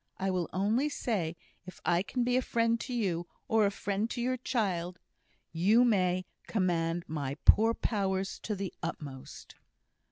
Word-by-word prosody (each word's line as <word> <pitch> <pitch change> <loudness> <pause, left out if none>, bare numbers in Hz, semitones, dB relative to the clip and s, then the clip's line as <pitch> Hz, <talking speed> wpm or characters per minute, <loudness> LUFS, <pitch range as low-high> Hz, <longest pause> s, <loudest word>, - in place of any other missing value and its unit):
I 190 0 0
will 180 -2 -1
only 220 +10 +1
say, 190 - -2 0.3
if 185 - -10
I 175 0 +3
can 245 +5 -1
be 245 +1 +1
a 255 - +4
friend 230 -1 +1
to 260 - -6
you, 185 -8 -1 0.2
or 220 -2 +4
a - - +2
friend 200 +2 -2
to 240 - -4
your 255 +2 +1
child, 185 -8 -1 0.5
you 205 +9 +4
may 185 -5 +2 0.2
command 175 -4 0
my 140 -3 -3
poor 225 +2 +6
powers 195 -3 -1
to 215 - -3
the 195 -2 -4
utmost." 145 -6 -7
195 Hz, 160 wpm, -31 LUFS, 175-230 Hz, 0.5 s, poor